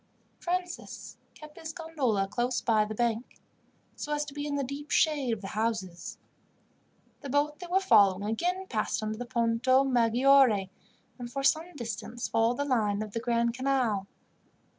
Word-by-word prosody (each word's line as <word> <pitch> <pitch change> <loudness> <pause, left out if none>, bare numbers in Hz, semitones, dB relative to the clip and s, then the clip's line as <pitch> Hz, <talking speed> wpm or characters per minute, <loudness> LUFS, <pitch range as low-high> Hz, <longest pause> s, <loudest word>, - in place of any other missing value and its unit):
Francis 355 0 -4 0.2
kept 305 0 -13
his 320 -1 -6
gondola 270 -13 -1
close 240 +4 -1
by 220 -2 +2
the 215 +1 -6
bank, 235 +1 -2 0.6
so 295 - -6
as 295 0 -1
to 280 - -9
be 290 0 -4
in 290 - -2
the 280 - 0
deep 280 +3 -6
shade 290 -6 +2
of 225 -3 -2
the 195 - -6
houses. 210 -6 -3 1.0
The 280 - -8
boat 290 +2 +1
they 355 - -7
were 365 +2 +3
following 205 - +4
again 355 - -1
passed 220 - -2
under 215 +1 -3
the 245 - -5
Ponto 240 +2 +2
Maggiore, 245 -4 +4 0.5
and 240 -1 -6
for 275 +2 -3
some 325 +4 +1
distance 235 -1 -5
followed 230 +2 +1
the 285 - -1
line 215 -6 +1
of 215 - -8
the 230 - -3
Grand 235 0 +1
Canal. 250 -6 0
245 Hz, 165 wpm, -29 LUFS, 220-290 Hz, 1.0 s, following